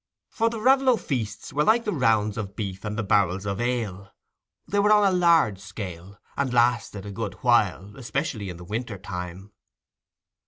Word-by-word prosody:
For 230 0 +1
the 230 -1 -5
Raveloe 260 +1 +4
feasts 120 - -4
were 150 - +2
like 230 +6 +3
the 210 - -1
rounds 110 -6 +2
of 100 -3 -5
beef 100 -3 -5
and 105 0 -4
the 110 - -1
barrels 100 -1 +1
of 100 +2 -2
ale—they 120 - -5
were 210 +1 +4
on 210 -1 +6
a 190 -2 +3
large 165 - +4
scale, 100 -1 -8 0.2
and 140 -2 -1
lasted 120 -4 +1
a 100 - -6
good 100 -1 -4
while, 105 -4 +2
especially 130 -5 -3
in 90 - -7
the 90 - -10
winter 110 +3 -4
time. 90 +1 -7
110 Hz, 170 wpm, -25 LUFS, 100-140 Hz, 0.2 s, on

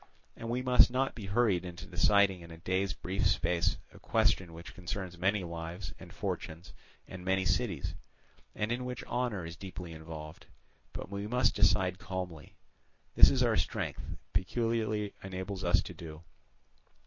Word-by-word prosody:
And 115 - -6
we 125 +2 0
must 125 -1 +7
not 130 +2 +1
be 105 -4 -7
hurried 100 -3 +3
into 90 +1 -7
deciding 95 0 +4
in 85 - -11
a 80 - -9
day's 95 +3 0
brief 95 +2 0
space 85 -1 +2 0.2
a - - -13
question 90 -3 +2
which 85 +3 -9
concerns 95 0 -5
many 95 +3 +1
lives 85 +2 -5
and - - -11
fortunes 85 +3 -4 0.3
and 95 -1 -8
many 95 0 +2
cities, 95 - 0 0.6
and 105 +2 -1
in 120 +1 -1
which 125 -1 -4
honour 120 -7 -1
is 85 +1 -6
deeply 90 -1 -7
involved—but 80 +2 -10
we 100 +1 -3
must 125 0 +3
decide 95 -3 +3
calmly. 90 -6 -5 0.6
This - - +7
our - - +3
strength - - -1 0.3
peculiarly 105 +2 0
enables 95 0 -4
us 85 - +4
to - - -7
do. 80 -1 -9
95 Hz, 150 wpm, -32 LUFS, 85-105 Hz, 0.6 s, must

